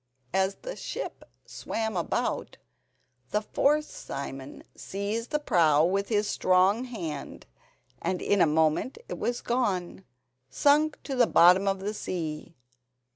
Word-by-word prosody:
As 190 Hz, +1 st, +1 dB
the -, -, -5 dB
ship -, -, -6 dB, 0.2 s
swam 220 Hz, -2 st, -4 dB
about, 175 Hz, -, -2 dB, 0.7 s
the 210 Hz, -, +1 dB
fourth 300 Hz, +7 st, +2 dB
Simon 135 Hz, -, -7 dB
seized 205 Hz, +4 st, -4 dB
the 300 Hz, -, +1 dB
prow 160 Hz, -, +3 dB
with 195 Hz, +3 st, 0 dB
his 210 Hz, -2 st, +1 dB
strong 190 Hz, +7 st, +3 dB
hand, 165 Hz, -, -6 dB, 0.6 s
and 185 Hz, -, -1 dB
in 200 Hz, -2 st, +2 dB
a -, -, +6 dB
moment 155 Hz, -, +1 dB
it -, -, -6 dB
was 240 Hz, 0 st, -1 dB
gone—sunk 185 Hz, -, 0 dB
to 275 Hz, -, -4 dB
the 245 Hz, -2 st, +4 dB
bottom 180 Hz, +3 st, +6 dB
of 195 Hz, -1 st, 0 dB
the 205 Hz, +2 st, -3 dB
sea. 160 Hz, -5 st, -5 dB
190 Hz, 130 wpm, -28 LUFS, 160-230 Hz, 0.7 s, a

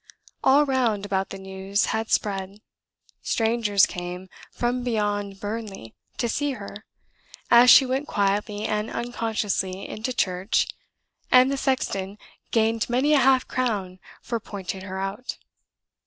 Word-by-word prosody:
All 280 Hz, +3 st, +5 dB
round 240 Hz, -7 st, 0 dB
about 195 Hz, -1 st, -1 dB
the 195 Hz, -, -7 dB
news 190 Hz, +1 st, -2 dB
had 220 Hz, 0 st, -2 dB
spread; 195 Hz, 0 st, -1 dB, 0.6 s
strangers 225 Hz, -3 st, +2 dB
came 180 Hz, +1 st, -7 dB, 0.2 s
"from 245 Hz, +1 st, -1 dB
beyond 205 Hz, -4 st, -1 dB
Burnley" 205 Hz, -, -6 dB, 0.2 s
to 240 Hz, -, 0 dB
see 285 Hz, +4 st, -1 dB
her, 205 Hz, -2 st, -9 dB, 0.7 s
as 240 Hz, +1 st, +8 dB
she 270 Hz, -, +9 dB
went 265 Hz, +3 st, -2 dB
quietly 205 Hz, +1 st, 0 dB
and 210 Hz, +1 st, -1 dB
unconsciously 220 Hz, -5 st, -2 dB
into 225 Hz, +4 st, -4 dB
church 185 Hz, -3 st, +1 dB, 0.7 s
and 255 Hz, +1 st, +6 dB
the -, -, 0 dB
sexton 210 Hz, -8 st, -1 dB, 0.3 s
"gained 225 Hz, 0 st, +1 dB
many 260 Hz, +5 st, +2 dB
a 295 Hz, -, +6 dB
half 260 Hz, 0 st, +4 dB
crown" 205 Hz, -8 st, -2 dB, 0.2 s
for 235 Hz, -1 st, -2 dB
pointing 195 Hz, -3 st, -6 dB
her 190 Hz, 0 st, -6 dB
out. 195 Hz, +6 st, -4 dB
210 Hz, 130 wpm, -24 LUFS, 195-245 Hz, 0.7 s, she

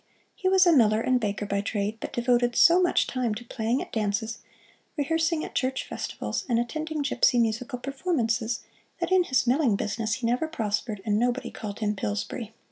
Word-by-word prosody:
He 375 Hz, -, -1 dB
was 380 Hz, 0 st, +5 dB
a 345 Hz, -, +6 dB
miller 220 Hz, -6 st, +4 dB
and 255 Hz, +2 st, +2 dB
baker 205 Hz, -2 st, -2 dB
by 200 Hz, 0 st, -1 dB
trade, 210 Hz, +1 st, -2 dB
but -, -, -6 dB
devoted 240 Hz, 0 st, +1 dB
so 350 Hz, +2 st, +6 dB
much 355 Hz, -, +3 dB
time 245 Hz, -4 st, -1 dB
to 240 Hz, +3 st, -8 dB
playing 230 Hz, +2 st, -1 dB
at -, -, -14 dB
dances, 220 Hz, +1 st, -1 dB, 0.6 s
rehearsing 325 Hz, +2 st, 0 dB
at -, -, -9 dB
church 265 Hz, 0 st, -1 dB
festivals, -, -, -4 dB
and 235 Hz, -, +3 dB
attending 310 Hz, +5 st, -2 dB
gipsy 275 Hz, -2 st, +3 dB
musical 235 Hz, +3 st, 0 dB
performances, 245 Hz, -5 st, -1 dB, 0.4 s
that -, -, -2 dB
in 370 Hz, -1 st, +4 dB
his 260 Hz, -3 st, +1 dB
milling 255 Hz, -3 st, +3 dB
business 215 Hz, +2 st, -1 dB
he 250 Hz, -, -4 dB
never 245 Hz, +7 st, +1 dB
prospered 210 Hz, -7 st, -3 dB
and 210 Hz, -1 st, +2 dB
nobody 245 Hz, +1 st, 0 dB
called 210 Hz, 0 st, -7 dB
him 210 Hz, -1 st, 0 dB
"Pillsbury." 210 Hz, +3 st, -4 dB
240 Hz, 185 wpm, -26 LUFS, 215-275 Hz, 0.6 s, a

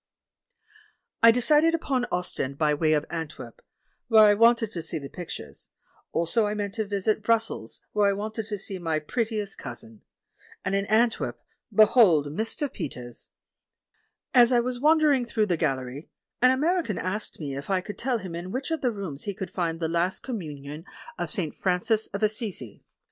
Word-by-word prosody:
I 230 Hz, -, +9 dB
decided 300 Hz, +7 st, +4 dB
upon 265 Hz, -6 st, -1 dB
Ostend, 140 Hz, -6 st, -2 dB
by 150 Hz, -1 st, +2 dB
way 155 Hz, +1 st, +2 dB
of 150 Hz, 0 st, +1 dB
Antwerp, 165 Hz, -, -6 dB, 0.5 s
where 220 Hz, -2 st, +7 dB
I 205 Hz, -, +6 dB
wanted 230 Hz, 0 st, +4 dB
to 170 Hz, -, -4 dB
see 165 Hz, +1 st, -4 dB
the 140 Hz, -2 st, -7 dB
pictures; 175 Hz, -2 st, -8 dB, 0.4 s
also 205 Hz, +7 st, +2 dB
I 210 Hz, -, -2 dB
meant 205 Hz, -1 st, -3 dB
to 220 Hz, 0 st, -2 dB
visit 205 Hz, +1 st, 0 dB
Brussels, 225 Hz, -, -1 dB
where 205 Hz, -1 st, +3 dB
I -, -, +2 dB
wanted 215 Hz, +2 st, -4 dB
to 210 Hz, -2 st, -3 dB
see 195 Hz, -1 st, -5 dB
my 165 Hz, -2 st, -1 dB
pret 220 Hz, +10 st, -1 dB
tiest 210 Hz, -3 st, -4 dB
cousin. 115 Hz, -4 st, -7 dB, 0.6 s
And 185 Hz, -, -1 dB
in 195 Hz, 0 st, 0 dB
Antwerp 225 Hz, +2 st, +1 dB, 0.2 s
— -, -, -59 dB
behold 185 Hz, -, +5 dB
Mr. 225 Hz, -, -1 dB
Pe 255 Hz, -, -4 dB
ters! 120 Hz, -2 st, -8 dB, 1.0 s
As 245 Hz, -1 st, +6 dB
I 245 Hz, -, +5 dB
was 245 Hz, +1 st, -2 dB
wandering 300 Hz, -3 st, +4 dB
through 220 Hz, -2 st, +1 dB
the 180 Hz, -4 st, +1 dB
gallery, 135 Hz, -1 st, -2 dB, 0.3 s
an 255 Hz, -, +7 dB
American 305 Hz, -, +1 dB
asked 195 Hz, +4 st, -4 dB
me 140 Hz, -4 st, -4 dB
if 140 Hz, +5 st, -7 dB
I 190 Hz, -1 st, +2 dB
could 205 Hz, +3 st, -8 dB
tell 255 Hz, -1 st, 0 dB
him 185 Hz, -5 st, -7 dB
in 175 Hz, +2 st, -5 dB
which 265 Hz, +7 st, -3 dB
of 320 Hz, -, -1 dB
the 250 Hz, -, +1 dB
rooms 185 Hz, -9 st, -6 dB
he 200 Hz, -2 st, -4 dB
would 190 Hz, -, -4 dB
find 165 Hz, -3 st, -2 dB
"The 165 Hz, -, 0 dB
Last 170 Hz, +3 st, 0 dB
Commun 160 Hz, -, -6 dB
ion 150 Hz, +4 st, -8 dB, 0.3 s
of -, -, -2 dB
St. 180 Hz, -10 st, 0 dB
Francis 195 Hz, +4 st, +1 dB
of 200 Hz, +2 st, -5 dB
Assisi." 210 Hz, -, -2 dB
205 Hz, 185 wpm, -26 LUFS, 165-230 Hz, 1.0 s, I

